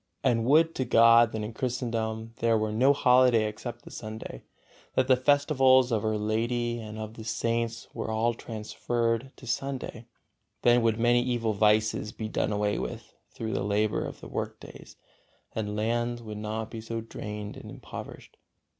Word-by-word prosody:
And 115 -1 +2
would 160 +5 +4
to 130 - -1
God 115 -1 +6
that 110 -1 -3
in 110 +2 -5
Christendom 115 -3 -3
there 115 -1 +2
were 110 0 -1
no 125 +6 +4
holiday 125 -4 +4
except 120 +3 -7
the - - -11
Sunday; 110 - -7 0.5
that 130 - +2
the 130 - +6
festivals 130 -1 +4
of 110 -3 +1
Our 110 -1 0
Lady 120 +3 -1
and 110 -1 -8
of 110 0 -6
the 115 - -9
Saints 115 +1 -2
were - - -4
all 110 +2 +1
transferred 115 +2 -2
to - - -13
Sunday; 125 -2 -4 0.6
then 120 0 +5
would 115 -1 +2
many 120 +1 +4
evil 120 -3 0
vices 105 +1 +2
be 110 - -5
done 110 - -1
away 105 0 0
with - - -6 0.2
through 110 -1 -5
the - - -1
labor 105 +1 +1
of - - -7
the - - -9
work - - -4
days, - - -12 0.6
and 105 -2 -3
lands 120 +2 -1
would 105 -1 -7
not 110 +1 -4
be 115 - -6
so 115 +1 -4
drained 105 -2 -7
and - - -10
impoverished. - - -10
115 Hz, 170 wpm, -28 LUFS, 110-120 Hz, 0.6 s, God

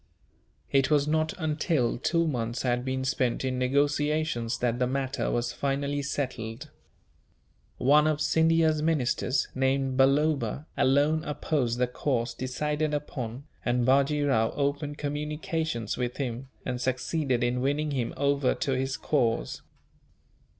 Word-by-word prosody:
It 135 -1 +3
was 150 -1 +3
not 155 +1 +1
until 155 -6 0
two 165 +4 +1
months 120 -4 -2
had 125 -1 +1
been 130 0 -2
spent 130 -2 0
in 130 -1 -1
negotiations 145 -2 +1
that 120 0 0
the 125 - +2
matter 135 0 -1
was 120 0 -1
finally 140 +1 -1
settled. 125 -5 -4 1.1
One 150 +4 +5
of 155 -1 +1
Scindia's 160 0 +3
ministers, 140 -4 +1
named 135 0 0
Balloba, 145 +2 +2
alone 145 +4 +3
opposed 140 -5 -1
the 125 - +3
course 125 -1 -1
decided 150 +4 -1
upon; 130 -4 -5 0.2
and 120 0 +1
Bajee 140 +3 +3
Rao 115 -5 +3
opened 145 +1 -1
communications 150 -4 -3
with 125 -1 -2
him, 130 -1 -4 0.2
and 125 0 -3
succeeded 130 0 0
in 125 +1 0
winning 145 +3 0
him 125 -4 -2
over 140 -2 +2
to 140 - -2
his 135 +1 -1
cause. 120 -7 0
135 Hz, 130 wpm, -28 LUFS, 125-150 Hz, 1.1 s, One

